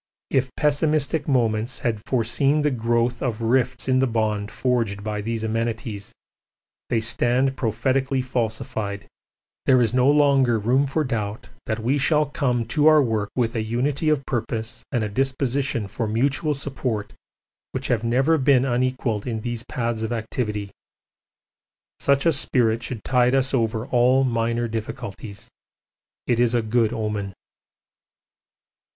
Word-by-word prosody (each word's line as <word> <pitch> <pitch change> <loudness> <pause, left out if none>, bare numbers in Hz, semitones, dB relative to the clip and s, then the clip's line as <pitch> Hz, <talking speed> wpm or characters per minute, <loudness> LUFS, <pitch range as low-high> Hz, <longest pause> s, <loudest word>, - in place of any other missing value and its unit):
If 130 -1 +1
pessimistic 150 0 +1
moments 120 -3 +1
had 110 -4 -2
foreseen 135 +5 +2
the 150 - +2
growth 120 0 0
of 115 -3 -2
rifts 125 +2 +1
in 130 0 +3
the 135 - +3
bond 110 -3 -1
forged 115 -6 -1
by 105 -1 -3
these 115 +1 -3
amenities, 110 -1 -3 0.8
they 115 - +2
stand 120 +4 +1
prophetically 130 +3 0
falsified; 110 -4 -3 0.6
there 130 -1 +6
is 115 -2 +1
no 130 +2 +4
longer 140 -5 +4
room 125 +6 +2
for 155 +4 0
doubt 110 -5 -4 0.2
that 110 - -1
we 125 +6 0
shall 150 +2 +3
come 125 -5 -1
to 150 +2 +3
our 155 -1 +7
work 110 -6 0
with 120 -2 0
a 115 - -1
unity 130 +8 0
of 145 -3 +1
purpose 115 -2 -3
and 120 -5 0
a - - -1
disposition 130 -1 -1
for 110 +3 -3
mutual 135 +7 0
support 130 -6 -4 0.6
which 130 0 -4
have 120 -3 +1
never 135 +7 +2
been 135 -1 +4 0.2
equalled 130 -4 -1
in 110 -3 -3
these 120 0 -4
paths 115 -2 -2
of 110 +1 -2
activity. 110 -3 -3 1.3
Such 140 0 +2
a 165 - +4
spirit 115 -5 +1
should 120 -2 -5
tide 125 0 +3
us 135 0 +1
[over] 115 -2 0
all 130 +1 +3
minor 115 -1 0
difficulties. 110 -2 -6 0.8
It 120 -1 +1
is 120 0 +3
a 120 - +1
good 110 0 +1
omen. 105 -4 -3
120 Hz, 145 wpm, -23 LUFS, 110-135 Hz, 1.3 s, our